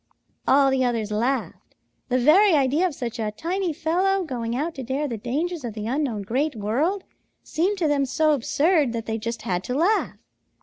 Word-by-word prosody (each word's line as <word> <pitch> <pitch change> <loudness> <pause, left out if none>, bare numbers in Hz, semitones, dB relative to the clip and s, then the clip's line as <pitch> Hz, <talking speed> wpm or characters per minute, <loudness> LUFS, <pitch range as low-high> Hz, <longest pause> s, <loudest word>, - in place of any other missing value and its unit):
"All 275 0 +5
the 265 -1 +2
others 230 -4 -1
laughed. 230 -2 -2 0.3
The 250 - +2
very 340 +10 +5
idea 290 +6 +2
of 320 - -6
such 240 -2 -5
a 215 -1 -1
tiny 350 - -2
fellow 365 +5 0
going 240 -6 -3
out 310 +6 -2
to 265 - -7
dare 270 +4 -2
the 240 - -4
dangers 295 - -3
of 230 -3 -5
the 210 -1 -5
unknown 245 -4 -1
Great 260 +8 -1
World 275 - -1 0.4
seemed 370 +6 -1
to 340 -4 +1
them 280 -2 +1
so 310 +3 +2
absurd 295 +1 +2
that 230 -1 -4
they 220 0 -3
just 230 0 -5
had 180 -1 -2
to 250 - -3
laugh. 400 +7 +1
275 Hz, 190 wpm, -24 LUFS, 230-320 Hz, 0.4 s, All